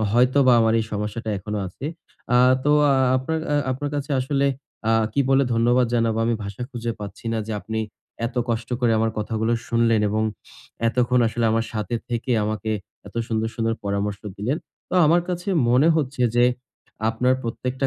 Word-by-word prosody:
অ - - 0
হয়তোবা 130 +2 +4
আমার 110 0 +3
এই 110 - -2
সমস্যাটা 105 +2 -3
এখনো 105 +2 -4
আছে। 95 +9 -10 0.5
আ - - +6 0.3
তো 145 - +3 0.2
আ - - +5 0.2
আপনার 145 +5 -1
অ্যা 145 - +1 0.2
আপনার 145 +3 -4
কাছে 145 +1 -4
আসলে 140 +1 +1 0.4
আ - - +4 0.2
কি 140 - +1
বলে 135 0 +4
ধন্যবাদ 120 +2 +3
জানাবো? 115 -1 +1
আমি 115 0 +1
ভাষা 100 +4 -6
খুঁজে 120 -1 -3
পাচ্ছি 105 +2 -8
না 115 - 0
যে, 110 - -4
আপনি 110 0 -4 0.5
এত 120 +1 -8
কষ্ট 115 0 -2
করে 120 -2 +3
আমার 110 0 +1
কথাগুলো 110 +2 -1 0.2
শুনলেন 115 -2 +3
এবং 110 +1 0 0.7
এতক্ষণ 125 +1 +2
আসলে 115 +1 -2
আমার 115 0 +1
সাথে 110 +2 -3
থেকে 120 +1 -3
আমাকে 110 0 -2 0.4
এত - - -12
সুন্দর, 110 0 0
সুন্দর 115 0 0
পরামর্শ 100 0 -2 0.2
দিলেন। 120 +9 -1 0.3
তো - - -4
আমার 170 +3 +5
কাছে 180 +2 -3 0.2
মনে 130 +6 +5
হচ্ছে 135 -4 -1
যে, 120 - +6 0.6
আপনার 125 +3 +2
প্রত্যেকটা 125 +3 -2
115 Hz, 180 wpm, -23 LUFS, 110-130 Hz, 0.7 s, আ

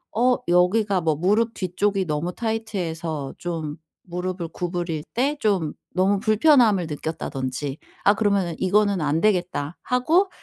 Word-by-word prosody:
어 245 +2 +3
여기가 185 +3 +3
뭐 160 -2 +1
무릎 210 +8 +2
뒤쪽이 190 +1 0
너무 155 +3 -2
타이트해서 170 - -3
좀 160 -4 -4 0.3
무릎을 180 -1 -4
구부릴 175 -3 -3
때 280 +5 +1
좀 195 - +1 0.2
'너무 195 +2 +3
불편함을 215 - +4
느꼈다.'든지 145 -3 -4 0.3
아 200 - +5
그러면은 200 -6 +1
'이거는 200 0 +2
안되겠다.' 170 0 0
하고 325 +10 +2
185 Hz, 295 characters per minute, -23 LUFS, 165-215 Hz, 0.3 s, 아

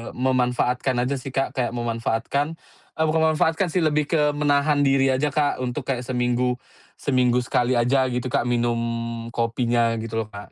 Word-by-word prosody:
memanfaatkan 125 0 +1
aja 140 +2 -1
sih, 130 - -7
Kak. 135 0 -1
Kayak 125 -4 -1
memanfaatkan 120 +6 -1 0.4
eee, 160 - +2
bukan 160 +1 +1
memanfaatkan 160 +4 +1
sih, 185 - +1
lebih 150 -1 +1
ke 150 -3 +3
menahan 145 0 +2
diri 135 -1 +3
aja, 140 +3 +1
Kak, 145 -2 0
untuk 125 -1 -3
kayak 130 -3 -1
seminggu 125 0 0 0.4
seminggu 125 -2 +2
sekali 125 0 +1
aja 130 +3 +3
gitu, 125 +1 -2
Kak, 135 +1 0
minum 120 -1 0 0.6
kopinya 115 0 +1
gitu 115 0 -3
loh, - - -17
Kak. 100 -1 -11
125 Hz, 165 wpm, -23 LUFS, 120-145 Hz, 0.6 s, ke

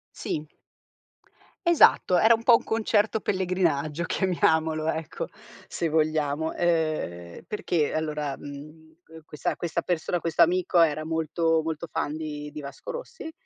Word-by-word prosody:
Sì 155 0 -4 1.2
Esatto, 325 - +5
era 220 +5 +6
un 225 - 0
po' 235 0 +7
un - - -11
concerto 220 -1 +1
pellegrinaggio 170 -5 0
chiamiamolo, 160 -4 +1
ecco, 160 -1 -4 0.4
se 165 - -2
vogliamo, 155 0 0
ehm, 155 - -1
perché 170 -7 -1
allora, 150 -3 -2
mhmm, 155 +3 -11
que 160 0 -13
questa 150 - -3
questa 170 0 -3
persona 175 0 -1
questo 165 0 0
amico, 175 +1 +3
era 155 -1 +2
molto 160 0 +1
molto 160 0 -4
fan 155 -2 -3
di 150 -2 -6
di 150 0 -7
Vasco 140 - -9
Rossi 485 -8 -7
160 Hz, 135 wpm, -26 LUFS, 155-175 Hz, 1.2 s, po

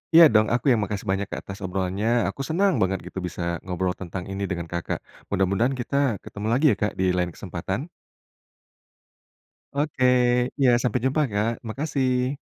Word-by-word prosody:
Iya 170 - +11
dong, 110 0 +5
aku 125 +3 +2
yang 115 - +4
makasih 100 0 -3
banyak 95 0 -1
Kak, - - -5
atas 100 +1 -8
obrolannya, 95 +2 -2 0.2
aku - - -25
senang 190 +3 +3
banget 95 0 +1
gitu 95 - -5
bisa 90 - -7 0.2
ngobrol 90 0 -1
tentang 90 0 -6
ini 100 +1 -3
dengan 85 -2 -3
Kakak. 85 -1 -2 0.3
Mudah-mudahan 100 +7 +1
kita 125 +2 -4 0.3
ketemu 105 +1 -6
lagi 135 +6 +2
ya - - +1
Kak, 105 -1 -1
di 95 - +2
lain 90 -1 0
kesempatan. 95 - -4 1.9
Oke, 145 -2 -1 0.6
iya, 130 -2 +5
sampai 125 0 +1
jumpa, 135 +4 +2
Kak, 105 +3 +1 0.2
makasih. 130 0 0
105 Hz, 165 wpm, -25 LUFS, 95-130 Hz, 1.9 s, Iya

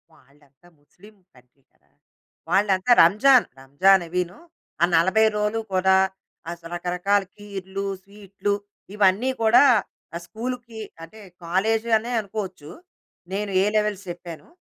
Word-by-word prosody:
వాళ్ళంతా 140 +4 -26
ముస్లిం 180 +8 -20 0.2
కంట్రీ 125 +2 -25
కదా! - - -38 0.6
వాళ్ళంతా 195 +2 +2
రంజాను 245 +9 +5
రంజాను 180 +8 +3
అవీను, 180 +1 -3 0.4
ఆ - - +7
40 190 +7 +3
రోలు 210 +2 -1
కూడా 190 0 +3 0.5
అస 170 0 -9
రకరకాల 180 +3 0
కీర్లు, 195 -1 -6 0.2
స్వీట్లు 200 0 -5 0.4
ఇవన్నీ 210 +4 +2
కూడా 225 +5 +6 0.5
ఆహ్, 170 - -5
స్కూలుకి 235 +2 -7 0.2
అంటే 190 +7 -13 0.2
కాలేజు 220 +7 0
అనే 230 +3 -6
అనుకోవచ్చు. 190 -7 -7 0.6
నేను 205 +1 -3
ఏ - - +1
లెవెల్స్ 210 -2 0
చెప్పాను. 170 -2 -9
195 Hz, 115 wpm, -23 LUFS, 175-215 Hz, 0.6 s, ఆ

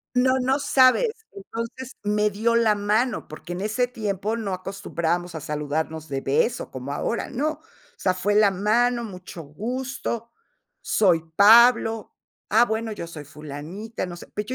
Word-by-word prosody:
No, 255 +1 +4
no 265 +3 +1
sabes. 270 - +4 0.2
Entonces, 230 +6 -7
me 210 +1 +2
dio 225 +3 +1
la 230 -2 +4
mano, 210 +4 0
porque 155 +3 -9
en 175 - -4
ese 215 +5 0
tiempo 215 -2 -3
no 200 -4 -3
acostumbrábamos 175 -2 -3
a 160 - -5
saludarnos 150 +2 -3
de 135 -2 -3
beso, 230 - 0
como 130 +2 -5
ahora. 230 +10 -2
No, 295 +5 0
o 310 - -6 0.4
sea, 185 - +1
fue 195 +3 0
la 210 -1 +6
mano: 235 +5 +1
"Mucho 180 -4 -8
gusto, 235 - -4 0.5
soy 180 -6 +3
Pablo". 225 +1 +6 0.3
"Ah, 225 +3 +6
bueno, 220 -1 -2
yo 170 - -6
soy 155 -3 -9
Fulanita". 155 +11 -7
No 175 -1 -7
sé. 175 - -11
Pero 210 0 -3
210 Hz, 155 wpm, -24 LUFS, 175-235 Hz, 0.5 s, la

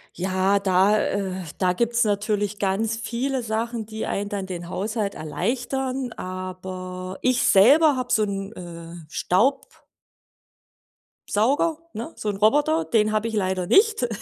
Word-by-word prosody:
Ja, 190 +2 +1
da, 195 +2 +3
äh 195 -2 -1 0.3
da 180 -1 +2
gibt's 235 +3 +1
natürlich 205 -1 -1
ganz 210 +3 0
viele 250 +3 -2
Sachen, 230 0 -3
die 220 0 -5
einen 200 +1 -2
dann 200 -2 -3
den 175 -2 -6
Haushalt 210 +1 -2
erleichtern, 255 - -2
aber 185 0 -6
ich 255 -1 +2
selber 280 +9 +6
habe 250 -1 -2
so 220 - +3
'n, 195 0 -3
äh, 170 -3 -9
Staub 230 +14 0 1.4
Sauger, 280 +9 +2 0.2
ne? 230 - -6
So 215 - -3
'n 205 - -2
Roboter, 295 +9 +3
den 215 -2 +2
habe 215 +1 0
ich 225 - -7
leider 185 -3 0
nicht. 405 - +4
210 Hz, 140 wpm, -24 LUFS, 190-235 Hz, 1.4 s, selber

